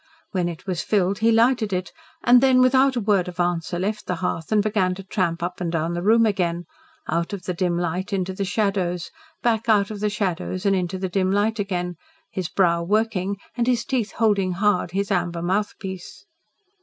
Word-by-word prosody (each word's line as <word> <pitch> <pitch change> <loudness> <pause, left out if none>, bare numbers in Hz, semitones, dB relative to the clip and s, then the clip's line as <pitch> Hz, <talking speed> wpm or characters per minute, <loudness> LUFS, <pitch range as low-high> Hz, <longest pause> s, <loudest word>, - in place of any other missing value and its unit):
When 180 -3 0
it 170 +1 -9
was 185 -4 -2
filled 195 -2 +1
he 225 +1 +4
lighted 230 -1 +3
it, 185 0 -2 0.3
and 245 0 +6
then 260 -1 +5
without 260 +1 +4
a - - +1
word 200 -4 +2
of 180 0 -8
answer 175 0 0
left 210 +4 -3
the 180 - 0
hearth 165 -1 -3
and 210 -1 +3
began 195 -4 +1
to 195 - -9
tramp 180 -3 -1
up 180 +1 -4
and 170 -2 -1
down 165 0 -1
the 175 - -2
room 225 +4 +4
again 175 -4 0 0.4
out 170 +4 -1
of 195 -3 -5
the 180 - -2
dim 175 0 0
light 175 +2 -2
into 190 -1 -1
the 195 - -3
shadows, 185 -3 -1 0.3
back 230 -1 +1
out 205 -1 +3
of 210 - -6
the 210 +1 0
shadows 185 -2 -2
and 200 -1 +4
into 185 0 -2
the 190 0 -2
dim 185 +1 0
light 210 +3 +1
again, 180 -3 -2 0.3
his 185 -3 -3
brow 170 -3 +2
working 200 0 0 0.2
and 240 -1 0
his 240 -2 +1
teeth 240 -6 -1
holding 200 -5 +2
hard 200 -1 +1
his 195 +3 -2
amber 175 -2 -1
mouthpiece. 190 -1 -3
190 Hz, 205 wpm, -23 LUFS, 175-210 Hz, 0.4 s, and